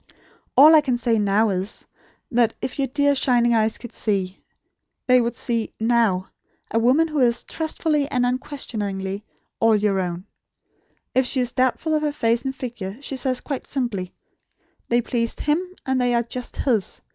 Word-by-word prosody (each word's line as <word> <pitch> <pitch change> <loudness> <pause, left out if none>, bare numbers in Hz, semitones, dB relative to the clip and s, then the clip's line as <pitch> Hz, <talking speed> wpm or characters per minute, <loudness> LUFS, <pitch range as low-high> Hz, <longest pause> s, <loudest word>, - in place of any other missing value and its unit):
All 300 +4 +9
I 310 - +8
can 260 -4 0
say 235 -2 +1
now 210 +2 +2
is: 190 +3 -3 0.5
that, 235 -2 +2
if 260 - -5
your 270 - +1
dear 285 +2 +2
shining 245 -3 +2
eyes 220 -1 +2
could 240 - -10
see, 195 -3 -2 0.6
they 250 -1 +5
would 235 0 -2
see, 230 -3 -2
NOW, 225 -5 +2 0.5
a 225 - +2
woman 260 +8 +4
who 305 -2 -2
is, 240 -2 +3
trustfully 310 -2 -1
and 250 -2 +1
unquestioningly, 210 -7 -3 0.4
all 225 -1 +4
your 205 -2 +1
own. 180 0 -3 0.9
If 260 0 +2
she 265 - +1
is 245 -1 0
doubtful 260 +5 0
of 305 - +2
her 300 -1 0
face 230 -4 +1
and 265 0 -2
figure, 230 -7 -6
she 275 -1 -5
says 255 -1 0
quite 275 -4 -5
simply: 220 -9 -3 0.8
'They 240 +1 +3
pleased 230 -1 -2
HIM; 300 +4 +1 0.2
and 260 -1 +1
they 245 -1 +2
are 235 - +2
just 245 +1 -6
HIS. 225 -8 -1
240 Hz, 170 wpm, -23 LUFS, 220-265 Hz, 0.9 s, All